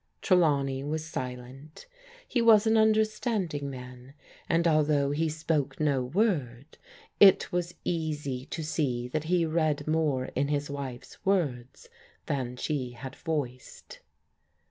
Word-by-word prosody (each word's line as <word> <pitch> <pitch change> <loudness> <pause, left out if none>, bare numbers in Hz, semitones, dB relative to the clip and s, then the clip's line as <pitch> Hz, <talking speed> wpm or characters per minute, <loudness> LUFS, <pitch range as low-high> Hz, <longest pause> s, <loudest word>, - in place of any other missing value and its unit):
Trelawney 140 -7 +2
was 155 +2 -3
silent. 130 +1 -7 0.4
He 245 - 0
was 225 -2 +6
an 220 0 +3
understanding 215 - +1
man, 125 0 -10 0.3
and 170 +1 +3
although 150 -3 +2
he 160 +2 0
spoke 150 -3 -2
no 140 -4 +1
word, 140 - -1 0.4
it 195 -2 +6
was 175 -1 -2
easy 150 -6 -3
to 165 - -5
see 135 -6 -1
that 155 +3 -2
he 175 0 +2
read 155 -2 0
more 155 -5 +1
in 140 +2 0
his 145 -1 -2
wife's 135 -3 -7
words 145 -11 -1 0.4
than 125 -3 -2
she 130 -2 -3
had 130 +3 -8
voiced. 135 -6 -5
150 Hz, 125 wpm, -28 LUFS, 130-165 Hz, 0.4 s, was